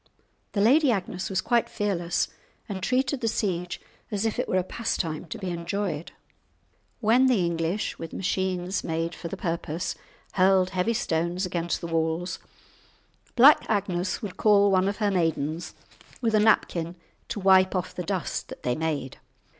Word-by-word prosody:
The 200 - +1
Lady 275 +7 +5
Agnes 185 -3 -2
was 190 -1 0
quite 240 -1 +1
fearless, 175 -5 -1 0.4
and 195 -4 -5
treated 260 +5 0
the 230 - 0
siege 180 -5 -1 0.3
as 210 -1 -1
if 220 - -1
it - - -1
were 185 - +2
a 185 - +2
pastime 175 -6 -3
to 165 - -6
be 190 -3 -4
enjoyed. 170 -1 -3 0.9
When 240 +4 +5
the 220 -9 +3
English, 170 +4 -2
with 165 -1 -6
machines 185 0 -1
made 165 +1 -2
for 170 - -7
the - - -6
purpose, 165 0 -2 0.4
hurled 185 -1 +3
heavy 190 +5 0
stones 170 -2 0
against 175 -1 -2
the 170 - -4
walls, 165 +2 -1 1.0
Black 275 +5 +8
Agnes 195 -2 -1
would 200 -3 -6
call 205 -2 +5
one 190 0 +3
of 205 - -4
her 210 -2 +1
maidens 165 -2 -1 0.4
with 230 -3 0
a 215 - +5
napkin 175 -5 +2 0.3
to - - -3
wipe 190 0 +5
off 185 0 -2
the - - -4
dust 185 0 -3
that - - -10
they 125 - +1
made! 150 -3 -3
185 Hz, 160 wpm, -26 LUFS, 170-205 Hz, 1.0 s, Black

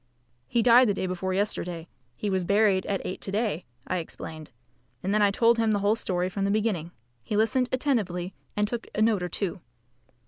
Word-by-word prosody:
"He 235 - +1
died 245 0 +7
the 200 - +1
day 190 - -2
before 185 +1 -2
yesterday. 180 -4 -2 0.3
He 205 - -2
was 190 -1 +1
buried 200 0 +3
at 195 -2 -2
eight 185 - -4
to 195 - -5
day," 205 -5 -1 0.2
I 185 - -1
explained; 160 -2 -7 0.5
and 195 - 0
then 215 - +3
I 205 - +5
told 230 +3 +3
him 225 -1 +2
the - - +2
whole 210 +2 +4
story 180 -5 -1
from 195 +1 -3
the 195 - +1
beginning. 205 -6 0 0.3
He 210 - -2
listened 250 +4 +2
attentively 200 -10 0 0.2
and 210 0 +2
took 235 +1 -4
a 215 - 0
note 220 -4 +2
or 180 - -2
two. 185 0 -2
200 Hz, 205 wpm, -27 LUFS, 185-220 Hz, 0.5 s, died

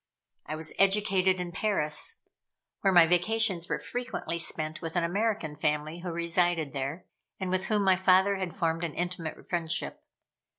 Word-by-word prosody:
I 155 - -3
was 160 0 -4
educated 195 -2 +3
in 180 -1 -4
Paris, 180 - 0 0.5
where 195 - +2
my 175 -2 +7
vacations 180 +1 +2
were - - 0
frequently 245 -8 -4
spent 155 -1 -2
with 165 +1 -5
an 175 - +2
American 195 -3 -1
family 150 +2 -1
who 175 0 -5
resided 170 -2 0
there, 140 +5 -4 0.3
and 185 -1 -3
with 185 0 +1
whom 210 -2 +1
my 190 -1 +4
father 190 +1 +4
had 185 -4 -4
formed 165 -2 -1
an 165 -3 -3
intimate 175 -2 -4
friendship. 170 -2 -2
175 Hz, 160 wpm, -28 LUFS, 160-190 Hz, 0.5 s, my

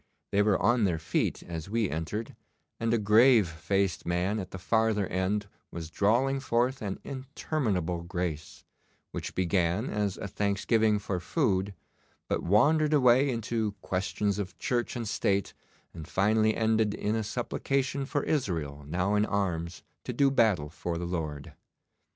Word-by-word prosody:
They 100 - +3
were 105 -2 +3
on 115 +2 +3
their 85 -4 +1
feet 80 - -1
as 85 0 -6
we 115 -1 +1
entered, 85 +8 -4 0.4
and 115 0 0
a 120 - +3
grave 110 0 +5
faced 90 +3 -1
man 90 +5 0
at 95 -2 -5
the - - -7
farther 110 +1 +1
end 95 +3 -1 0.2
was 80 -1 -7
drawling 120 +9 +2
forth 125 +1 0
an 100 -3 -3
interminable 125 - -2
grace, 85 -3 -4 0.5
which - - -5
began 90 +4 +1
as 105 -2 -1
a - - -5
thanksgiving 105 +2 +1
for 95 -3 -3
food, 100 - 0 0.5
but - - -1
wandered 150 - +3
away 130 0 +5
into 115 -3 -1
questions 100 +2 -1
of 95 -2 -5
Church 120 -1 -1
and 120 -2 -3
State, 100 -1 0 0.4
and 80 -2 -8
finally 110 +2 +2
ended 110 -2 +2
in 105 - -1
a 110 - -1
supplication 135 +4 -2
for 145 -1 -1
Israel 80 - -2
now 90 +6 0
in 105 0 +3
arms 90 -5 -2 0.2
to - - -3
do 140 -1 +3
battle 105 - +2
for 85 0 -4
the 85 - -3
Lord. 80 -5 -4
105 Hz, 150 wpm, -29 LUFS, 90-115 Hz, 0.5 s, grave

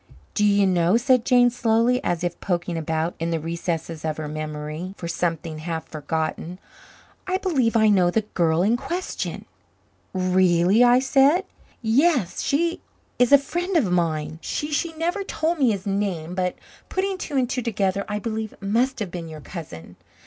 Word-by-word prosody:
"Do 210 - +1
you 200 -1 +4
know," 180 +2 +3
said 250 -1 +3
Jane 245 -1 +5
slowly, 235 +1 +2
as 175 0 -1
if 175 -1 -2
poking 175 -2 -1
about 160 +1 -1
in 165 +1 -1
the 165 -1 0
recesses 165 0 -4
of 155 -1 -2
her 155 -1 -4
memory 155 +4 -5
for 170 - -6
something 165 -2 -2
half 160 0 -4
forgotten. 160 +3 -3 0.7
"I 370 0 +1
believe 275 -12 +1
I 220 -1 +5
know 190 -4 +4
the 220 +5 +1
the 210 - -23
girl 165 0 +2
in 225 +4 +3
question." 350 +8 -4 0.7
"Really?" 185 +2 +3
I 245 0 +6
said. 275 +6 +4 0.4
"Yes, 250 - +2
she 335 +4 0 0.4
is 245 0 +4
a 285 - +10
friend 350 +6 -2
of 220 - +1
mine. 160 -3 -1
She 295 +1 -3
she 330 +3 0
never 345 +5 -2
told 335 -3 -1
me 260 -4 +4
his 200 -4 -2
name, 195 -5 -2
but 180 -1 -1 0.3
putting 380 0 -1
two 290 - -3
and 255 -2 +2
two 250 +1 -2
together, 200 -4 0
I 210 - -2
believe 220 0 -4
it - - -22
must 240 +7 +1
have 195 -4 -3
been 170 -2 -6
your 155 -1 -9
cousin. 90 - -9
195 Hz, 180 wpm, -23 LUFS, 170-250 Hz, 0.7 s, a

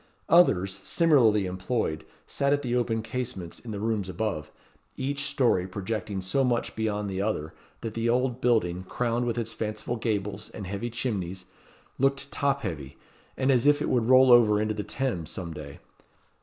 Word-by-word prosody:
Others, 100 - +4
similarly 120 - +4
employed, 95 -2 -2 0.2
sat 140 0 +1
at 145 0 0
the 125 -1 -1
open 115 -2 0
casements 115 -8 -5
in 120 - -11
the 105 -2 -4
rooms 105 -3 -1
above; 90 -5 -3 0.5
each 140 +1 -2
story 115 -11 +2
projecting 100 0 -4
so 115 +9 +1
much 120 -2 0
beyond 105 -2 -1
the 95 -1 -2
other 85 -7 -2 0.3
that 115 - -4
the 115 +1 0
old 125 +1 +1
building, 95 -7 +1
crowned 120 +3 -1
with 120 - -1
its 115 -1 -2
fanciful 110 +2 -3
gables 105 -2 -2
and 100 - -6
heavy 100 +5 -4
chimnies, 95 -7 -3 0.5
looked 140 +1 +1
top 140 -1 0
heavy, 75 - -5 0.4
and 135 +1 +2
as 125 +1 +3
if 145 0 +5
it - - -1
would 120 -2 +1
roll 130 0 +7
over 110 -4 +6
into 110 0 0
the 105 - -3
Thames 110 - -3
some 85 -3 -5
day. 75 -2 -9
110 Hz, 170 wpm, -27 LUFS, 95-125 Hz, 0.5 s, roll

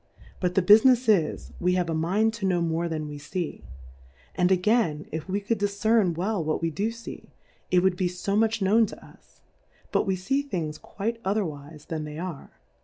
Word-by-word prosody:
But 180 -1 -1
the 190 - +3
Bufinefs 230 +5 +6
is, 185 -8 +2
we 180 +1 +2
have 180 -2 0
a 165 - -1
mind 195 +8 +1
to 210 -4 -2
know 180 -2 +2
more 170 0 -1
than 155 -2 -3
we 145 -1 -7
fee: 170 +4 -4 0.7
And 180 +1 +2
again, 180 -5 +2
if 160 +3 -5
we 195 +2 0
could 205 +2 -2
dif 205 0 +1
cern 200 -3 +2
well 190 0 -1
what 155 0 -1
we 165 -1 -1
do 205 +8 -1
fee, 230 0 -10 0.4
it 180 -1 +3
would 190 -1 +2
be 185 - +1
fo 180 +3 -2
much 220 0 +2
known 215 +3 +4
to - - -11
us; - - -21 0.5
but - - +1
we 190 - +1
See 205 +10 0
Things 165 - -4
quite 230 +3 -4
otherwife 155 -7 -3
than 155 -2 -3
they 150 0 -7
are. 170 -4 -6
185 Hz, 200 wpm, -26 LUFS, 165-215 Hz, 0.7 s, Bufinefs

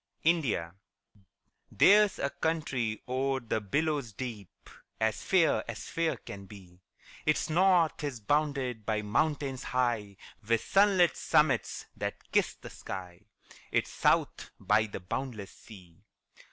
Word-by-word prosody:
INDIA. 135 - +1 1.0
There's 210 0 +5
a 140 - -1
country 130 -9 -2
o'er 135 +1 0
the 115 -3 -2
billows 140 +2 -1
deep, 110 -5 -8 0.3
As 110 -2 0
fair 180 -4 +3
as - - -6
fair 165 -1 0
can 100 -4 -10
be; 95 -3 -14 0.5
Its 155 +1 +1
north 175 -2 +3
is 140 -5 -3
bounded 135 -1 0
by 105 0 -1
mountains 135 +4 0
high, 120 -7 -1 0.3
With 115 -1 +2
sunlit 195 -3 +4
summits - - +1
that - - -6
kiss - - +2
the - - -11
sky, 90 -1 -8 0.5
Its - - 0
south - - +1
by 110 +1 +2
the 100 - -7
boundless 110 +1 -5
sea. 90 -6 -15
125 Hz, 125 wpm, -30 LUFS, 105-155 Hz, 1.0 s, There's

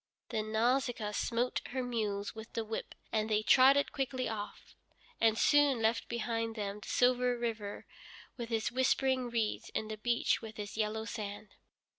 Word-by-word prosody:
Then 215 -2 -2
Nausicaa 235 -1 +1
smote 235 +3 0
her 260 0 -2
mules 210 -4 -2
with 220 +1 -10
the 225 - -2
whip, 220 +1 -5 0.2
and 215 0 0
they 215 0 +2
trotted 270 +5 +6
quickly 260 -2 -2
off, 210 -2 -6 0.4
and 225 -1 +4
soon 290 -3 +4
left 225 +1 +1
behind 230 -1 -2
them 205 -1 -4
the - - -11
silver 250 0 +3
river 225 -4 -4 0.5
with 235 -2 -6
its 225 +1 0
whispering 260 0 +2
reeds, 230 -3 -1
and 220 0 -2
the 215 - -4
beach 235 +1 +1
with 220 -1 -9
its 205 -1 -6
yellow 220 0 -1
sand. 210 -2 -6
225 Hz, 160 wpm, -33 LUFS, 215-245 Hz, 0.5 s, trotted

